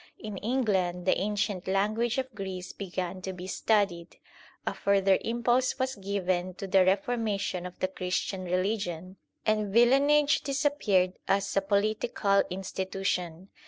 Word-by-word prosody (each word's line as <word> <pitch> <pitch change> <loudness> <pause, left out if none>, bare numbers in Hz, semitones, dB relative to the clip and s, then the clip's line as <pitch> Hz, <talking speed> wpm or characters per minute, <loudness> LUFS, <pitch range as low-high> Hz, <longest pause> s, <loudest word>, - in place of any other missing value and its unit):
In 210 -2 -7
England 190 -7 0
the 185 - +4
ancient 205 -2 -1
language 215 +5 +1
of 260 -1 -3
Greece 190 -3 -6
began 185 -1 -4
to 190 0 -4
be 180 0 -8
studied; 190 -3 0 0.5
a - - -1
further 195 -1 +3
impulse 240 +2 +1
was 260 0 -1
given 185 -3 -2
to 195 +1 -6
the 190 0 +4
reformation 195 -2 0
of 180 - -12
the 185 - 0
Christian 185 0 -3
religion; 185 -1 -2 0.3
and 215 -2 +1
villenage 280 +6 +4
disappeared 270 -10 +1
as 200 0 +1
a 195 - +4
political 200 0 +1
institution. 190 -1 -3
195 Hz, 130 wpm, -28 LUFS, 185-220 Hz, 0.5 s, the